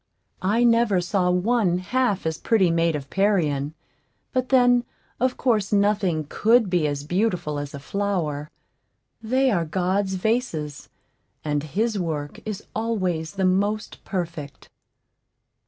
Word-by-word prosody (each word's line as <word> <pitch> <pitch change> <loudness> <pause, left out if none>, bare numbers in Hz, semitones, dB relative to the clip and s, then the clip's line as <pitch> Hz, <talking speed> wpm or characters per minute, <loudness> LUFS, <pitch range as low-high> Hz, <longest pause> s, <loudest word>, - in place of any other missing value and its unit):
I 215 +6 +2
never 230 -5 +4
saw 180 0 +1
one 180 0 +2
half 205 +1 0
as 160 0 -2
pretty 195 -7 +3
made 165 -1 +2
of 140 -2 -6
Parian; 160 -8 +1 0.6
but, 255 0 0
then, 245 -2 +5 0.4
of 255 +1 +1
course 215 -6 +1
nothing 200 -6 +2
could 225 +3 +3
be 175 -4 +2
as 145 -1 -3
beautiful 175 -3 -1
as 145 0 -6
a - - -6
flower; 155 -4 -2 0.7
they 260 +4 +2
are 175 -5 +1
God's 190 +4 0
vases, 180 - -2 0.6
and 145 -1 0
his 210 +8 -1
work 150 -4 -3
is 210 -2 -5
always 185 -8 -1
the 190 -1 0
most 205 +3 0
perfect. 170 -6 -5
190 Hz, 130 wpm, -24 LUFS, 160-220 Hz, 0.7 s, then